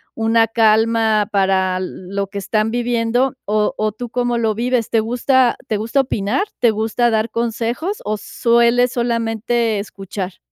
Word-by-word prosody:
una 225 0 +2
calma 220 -1 +2
para 190 -2 +1
l 185 0 -3 0.3
lo 200 0 0
que 200 +1 -6
están 215 +3 0
viviendo?, 240 +1 0
¿o 210 0 0
o 215 0 0
tú 235 +3 -7
cómo 245 -1 -1
lo 220 -2 0
vives?, 240 0 0
¿te 225 - +2
gusta 245 +2 +2
te 215 - -1
gusta 230 +6 +1
opinar, 250 - -1
te 235 -3 +3
gusta 225 +2 0
dar 220 +1 0
consejos, 235 - -2
o 215 0 -2
sueles 235 +3 +2
solamente 230 -1 0
escuchar? 195 -2 -6
225 Hz, 155 wpm, -19 LUFS, 215-240 Hz, 0.3 s, te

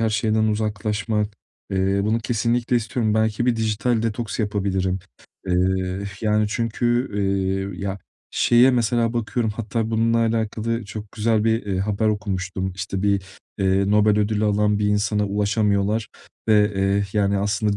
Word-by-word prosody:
her 110 -1 +1
şeyden 110 +1 +1
uzaklaşmak. 105 0 -1 0.4
Eee, 95 +1 +1
bunu 110 +2 +1
kesinlikle 120 +2 0
istiyorum. 110 -1 0
Belki 110 +2 +1
bir 120 -2 +2
dijital 110 +1 0
detoks 115 0 -3
yapabilirim. 95 -3 0 0.5
Eee, 95 +1 0 0.2
yani 105 -1 +2
çünkü, 120 +3 0
eee, 95 -1 -1
ya, 100 0 -3 0.3
şeye 120 +2 +5
mesela 120 -1 +1
bakıyorum; 115 -1 -1
hatta 110 +1 -3
bununla 115 +1 +2
alakalı 115 0 -1
çok 105 +1 -8
güzel 110 -1 +1
bir, 115 -1 +1
eee, 95 -2 -1
haber 105 +2 0
okumuştum. 95 -2 -2
İşte 95 +1 -4
bir, 100 -1 +2 0.4
eee, 95 0 +2
Nobel 105 0 +4
ödülü 105 0 +1
alan 105 0 +2
bir 105 - +1
insana 105 0 +1
ulaşamıyorlar 105 +1 0 0.4
ve, 105 -1 +4
eee, 95 +1 +1
yani 100 -1 +1
aslında 100 +1 0
105 Hz, 140 wpm, -22 LUFS, 100-110 Hz, 0.5 s, şeye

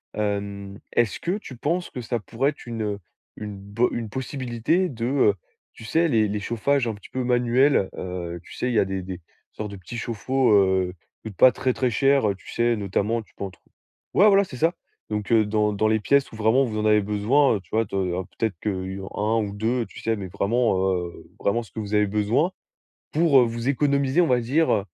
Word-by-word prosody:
Hem, 100 -1 -3
est-ce 120 -2 +1
que 180 +4 -1
tu 140 -11 -10
penses 170 +8 -1
que 125 - -6
ça 120 +1 -2
pourrait 120 +6 -1
être 145 - -15
une 110 -4 -3 0.4
une 105 -1 -6
bo 100 +5 0
une 115 -2 -4
possibilité 130 - -1
de, 115 -3 -4
heu, 130 -5 +3 0.4
tu 115 - -12
sais, 165 +8 +2
les 110 -8 +3
les 105 +1 -2
chauffages 120 +5 0
un 110 - -2
petit 100 - -14
peu 130 - -3
manuels? 125 -2 +3
Heu, 85 -2 -5
tu - - -13
sais, - - -2
il - - -1
y 110 - +4
a - - +3
des 95 -1 -3
des 90 -1 -7 0.3
sortes 105 -1 -6
de - - -7
petits 95 +6 -8
chauffe-eau, 125 +3 0
heu, 95 -2 +3 0.2
qui 110 - -8
coûtent 100 - -13
pas 130 - +8
très, 130 0 -1
très 130 0 0
cher, 135 +1 +3
heu, 100 - -1
tu 95 - -15
sais, 120 0 +2
notamment, 105 +2 -1
tu 110 - -20
peux - - -6
en 95 - -4
trou - - -22 0.5
ouais, 200 - +7
voilà 200 -1 +6
c'est 140 -10 -9
ça! 165 +6 +2 0.4
Donc 105 -1 -3
heu, 110 -2 +5
dans 105 0 +1
dans 110 +2 +1
les 110 0 +2
pièces 140 +5 +2
où - - -10
vraiment 110 +5 +3
vous 110 -3 -4
en 105 - -1
avez 105 0 +5
besoin, 105 +7 +2
heu, - - -2
tu 90 - -27
vois, 115 +1 +2
de 100 - -7
alors 90 -1 -1
peut-être 110 -3 -1
que 95 -2 -3 0.2
1 110 +2 +1
ou 100 -2 -4
2, 115 +4 0
tu - - -12
sais 115 - 0
mais 100 -2 -5
vraiment, 100 +4 +1 0.2
heu, 90 -1 -5
vraiment 115 +4 0
ce 105 - -17
que - - -7
vous 105 -1 -5
avez 105 0 +3
besoin, 105 - +1 0.6
pour, 155 -4 +5
heu, - - +5
vous 115 +1 -3
économiser, 140 +2 +2
on 175 - +4
va 125 -1 +3
dire, 140 +8 +1
heu, 100 -3 +1
110 Hz, 235 wpm, -24 LUFS, 100-130 Hz, 0.6 s, pas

